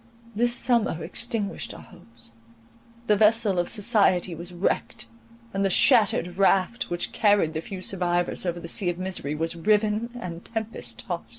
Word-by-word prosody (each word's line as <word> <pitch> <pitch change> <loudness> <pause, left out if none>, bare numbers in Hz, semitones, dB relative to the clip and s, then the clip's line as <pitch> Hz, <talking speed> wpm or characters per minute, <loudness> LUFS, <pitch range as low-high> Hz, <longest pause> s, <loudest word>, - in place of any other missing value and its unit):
This 240 +3 +2
summer 230 -11 +1
extinguished 230 +1 -3
our - - -11
hopes, 115 -11 -15 0.7
the 210 - +3
vessel 210 -2 +3
of 175 - -1
society 200 -5 +3
was 170 +2 -7
wrecked, 175 +2 -2 0.5
and 195 0 0
the 195 - +2
shattered 190 -6 +3
raft, 195 +3 +2
which 175 0 -2
carried 205 -7 +2
the 160 - -3
few 185 +2 -8
survivors 175 -2 -1
over 175 -1 -2
the 170 - -8
sea 180 +2 +1
of 175 - -3
misery, 180 -6 -3
was 165 +2 -2
riven 210 +5 +1
and 170 -5 -7
tempest 225 -1 -6
tost. - - -5
190 Hz, 160 wpm, -25 LUFS, 175-215 Hz, 0.7 s, the